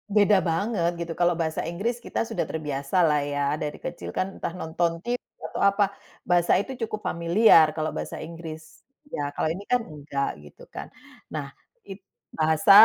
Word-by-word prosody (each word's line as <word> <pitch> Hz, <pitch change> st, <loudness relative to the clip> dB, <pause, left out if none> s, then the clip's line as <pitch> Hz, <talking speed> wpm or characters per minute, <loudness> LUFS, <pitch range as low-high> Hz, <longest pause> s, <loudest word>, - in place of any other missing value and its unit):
Beda 205 Hz, -1 st, +6 dB
banget 175 Hz, 0 st, +1 dB
gitu 170 Hz, -, -6 dB
kalo 175 Hz, -1 st, +4 dB
bahasa 160 Hz, -1 st, -1 dB
Inggris 220 Hz, +8 st, -2 dB
kita -, -, -2 dB
sudah 225 Hz, -, -1 dB
terbiasa 145 Hz, -1 st, -3 dB
lah 150 Hz, -3 st, +4 dB
ya 145 Hz, -, 0 dB, 0.2 s
dari 150 Hz, -1 st, -3 dB
kecil 175 Hz, -, -6 dB
kan 190 Hz, +1 st, -2 dB
entah -, -, -3 dB
nonton 165 Hz, 0 st, -1 dB
TV 245 Hz, +1 st, -1 dB, 0.3 s
atau -, -, -4 dB
apa, 200 Hz, +1 st, +4 dB, 0.5 s
bahasa 175 Hz, -1 st, +4 dB
itu 265 Hz, -, -8 dB, 0.2 s
cukup 215 Hz, -1 st, -5 dB
familiar 170 Hz, +1 st, +6 dB
kalo 155 Hz, 0 st, -1 dB
bahasa -, -, -5 dB
Inggris, 160 Hz, +1 st, -9 dB, 0.2 s
iya -, -, -2 dB
kalau 155 Hz, -, +1 dB
ini 185 Hz, +5 st, -5 dB
kan 250 Hz, -1 st, +4 dB
nggak 145 Hz, -4 st, -3 dB, 0.2 s
gitu -, -, -16 dB
kan -, -, -6 dB, 0.4 s
nah 145 Hz, -3 st, -5 dB, 0.3 s
it 195 Hz, +1 st, -9 dB, 0.4 s
bahasa 160 Hz, +4 st, +4 dB
170 Hz, 170 wpm, -26 LUFS, 155-200 Hz, 0.5 s, Beda